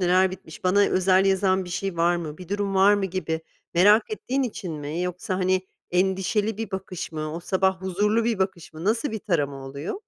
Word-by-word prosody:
neler 185 +1 +4
bitmiş, 185 -2 -11
bana 195 +3 +4
özel 190 -1 +4
yazan 190 -1 +2
bir - - -9
şey 190 -1 -3
var 170 +1 +3
mı, 155 -2 -6
bir 180 -2 -10
durum 200 -1 -1
var 195 +2 +6
mı 200 -1 0
gibi 170 -3 -3 0.3
merak 205 - +5
ettiğin 275 -10 -1
için 205 -8 -4
mi? 150 +2 -4
Yoksa 180 +1 -3
hani, 185 0 +1 0.2
endişeli 190 +4 +1
bir 225 -3 -4
bakış 190 -3 -5
mı, 155 0 -4
o 170 - -4
sabah 190 +1 +1
huzurlu 210 +5 +1
bir 230 -4 0
bakış 190 -4 -2
mı, 160 +2 -8
nasıl 225 +7 +1
bir 220 - -3
tarama 145 -9 -1
oluyor? 140 +4 -5
185 Hz, 200 wpm, -25 LUFS, 175-200 Hz, 0.3 s, var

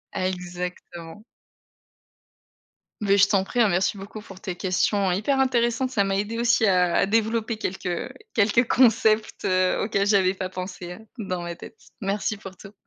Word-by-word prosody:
Exactement. 180 0 -5 1.8
Beh, 200 -1 +3
je 195 0 +6
t'en 195 -3 +2
prie, 245 +5 -4
hein, 225 - +6
merci 185 +3 +1
beaucoup 205 +2 -9
pour 190 -2 -13
tes 185 -3 -5
questions 190 +1 +1
hyper 240 +9 0
intéressantes. 255 0 +1
Ça 205 -6 +2
m'a 195 0 0
aidée 220 +3 -2
aussi 235 -2 +3
à 180 -3 +3
à - - +4
développer 225 +1 0
quelques 180 -4 -4 0.2
quelques 225 +3 +3
concepts, 220 -3 +3
heu, 185 0 +2
auxquels 200 -1 0
j'avais 190 -2 +3
pas 185 -1 -4
pensé, 180 -1 -7
heu, - - -12 0.2
dans 185 -5 -3
ma 175 0 -5
tête. 225 - -12 0.2
Merci 205 +1 -1
pour 195 -2 -10
tout. 195 +4 -13
200 Hz, 165 wpm, -24 LUFS, 185-220 Hz, 1.8 s, je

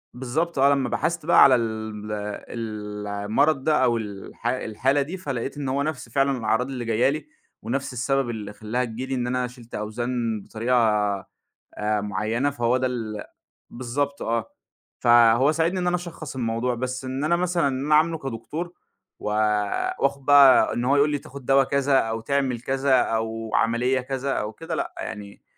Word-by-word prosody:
بالضبط، 135 +5 -2
آه، 140 - +6
لمّا 135 -2 0
بحثت 170 -2 -1
بقى 170 - +7
على 130 -2 +7
ال 110 -2 -3
ال 105 0 -5
المرض 110 +9 +1
ده 155 -4 +3
أو 120 -2 +3
الح 105 +2 -6
الحالة 130 +3 0
دي، 165 +7 -4
فلقيت 135 -5 -4
إن 140 -2 -3
هو 140 +2 0
نَفْس 145 -5 -4
فعلًا 135 +1 +1
الأعراض 115 +3 0
اللي 125 -3 -5
جاية 115 +3 +2
لي 155 - -4 0.3
ونَفْس 135 +1 -3
السبب 135 +1 0
اللي 105 -3 -5
خلّاها 120 +4 -2
تيجي 120 +3 -5
لي، 135 - -3
إن 125 -1 -1
أنا 125 0 0
شِلت 120 -1 -12
أوزان 115 0 -2
بطريقة 115 +5 -1 1.0
آآ، 105 0 0
مُعيّنة 105 +7 -1
فهو 120 -3 +1
ده 130 0 0
ال 110 -4 -4 0.5
بالضبط 140 +4 -3
آه. 115 -2 -1 0.5
فهو 120 +4 +5
ساعدني 165 +4 0
إن 180 - -2
أنا 175 - +2
أشخّص 170 -5 -7
الموضوع 120 +1 -1
بس 130 +2 -4
إن 130 +3 -3
أنا 170 +2 +3
مثلًا 175 -4 +1
أنا 140 +3 0
أعاملُه 160 +1 +3
كدكتور 150 +7 -5 0.5
و - - -4 0.7
وآخد 140 0 0
بقى 140 -2 +7
إن 120 - -2
هو 140 +3 +3
يقول 145 +1 +4
لي 145 - 0
تاخد 135 -1 -11
دوا 135 0 +5
كذا، 140 0 +2
أو 115 0 -1
تعمل 130 -1 -1
كذا، 135 0 +2
أو 115 0 -2
عملية 120 +3 +2
كذا، 135 +1 -3
أو 105 -2 -2
كده 165 +6 -6
لأ، - - -3
يعني 100 -1 -8
125 Hz, 175 wpm, -24 LUFS, 115-140 Hz, 1.0 s, بقى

